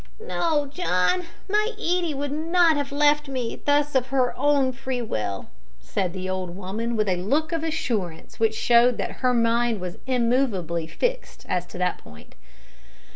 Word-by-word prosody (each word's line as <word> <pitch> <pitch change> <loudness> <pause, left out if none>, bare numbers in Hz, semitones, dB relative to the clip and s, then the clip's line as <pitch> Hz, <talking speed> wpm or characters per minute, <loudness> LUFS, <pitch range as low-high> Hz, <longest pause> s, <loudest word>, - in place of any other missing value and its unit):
"No, 330 -9 0
John, 295 - +1 0.2
my 425 +3 +1
Edie 350 -6 0
would 285 0 -3
not 330 +2 +3
have 285 -1 -2
left 295 +1 +3
me 255 -4 -4
thus 290 0 +2
of 260 -1 +2
her 255 -1 +1
own 285 -3 +3
free 260 0 -4
will," 105 - -3 0.3
said 175 - -2
the 185 0 -5
old 185 -2 -3
woman, 210 +5 -3
with 215 -1 +1
a 185 -2 +1
look 285 - 0
of 330 -1 -1
assurance 225 - -3
which 220 -1 +2
showed 240 0 +4
that - - -4
her 255 - +3
mind 230 -1 +2
was 180 -1 -6
immovably 230 - +1
fixed - - -3
as 180 -1 -1
to 180 - -10
that 180 0 0
point. 75 - -15
250 Hz, 165 wpm, -24 LUFS, 190-295 Hz, 0.3 s, showed